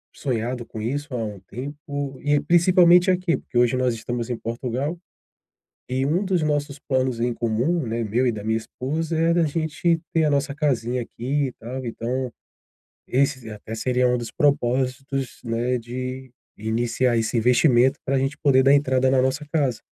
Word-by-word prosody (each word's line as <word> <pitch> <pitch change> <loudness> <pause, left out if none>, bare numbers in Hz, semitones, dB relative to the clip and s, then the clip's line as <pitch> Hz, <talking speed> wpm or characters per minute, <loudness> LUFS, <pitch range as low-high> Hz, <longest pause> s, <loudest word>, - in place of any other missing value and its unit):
sonhado 120 -2 -2
com 110 - -8
isso 140 +4 -3
há 115 - -1
um 105 -3 -7
tempo, 140 +3 -6
e 145 0 +2
principalmente 175 +1 +5
aqui, 180 -2 +1
porque 120 - -6
hoje 120 0 +4
nós 125 -2 +1
estamos 120 +1 -4
em 120 - -2
Portugal, 125 +7 -3 0.9
e 130 +1 0
um 170 +8 +1
dos 185 -3 +1
nossos 145 -1 -1
planos 130 -4 -1
em 120 0 0
comum, 120 +8 0
né, 115 +1 -2
meu 120 +5 +1
e 120 - +3
da 105 -2 -6
minha 110 +1 +1
esposa, 155 +8 -3
é 165 +1 +3
da 170 -1 +3
gente 160 +2 0
ter 165 -1 +3
a 150 - +3
nossa 140 0 0
casinha 125 -5 0
aqui, 135 +5 -2
e 130 - -5
tal. 130 +3 -6
Então, 125 +2 -3 0.8
esse 130 -2 +1
e - - -7
até 110 +1 -8
seria 125 +2 +1
um 125 - +2
dos 115 -2 -5
propósitos, 135 -1 0
né, 120 +2 0
de 130 +2 -6 0.3
iniciar 120 +3 0
esse 115 +1 0
investimento 125 +2 +4
pra 135 0 +1
gente 135 +2 -1
poder 130 -3 +4
dar 135 - +5
entrada 130 -2 +3
na 130 -1 +4
nossa 130 +3 0
casa. 140 -7 0
130 Hz, 175 wpm, -23 LUFS, 120-145 Hz, 0.9 s, principalmente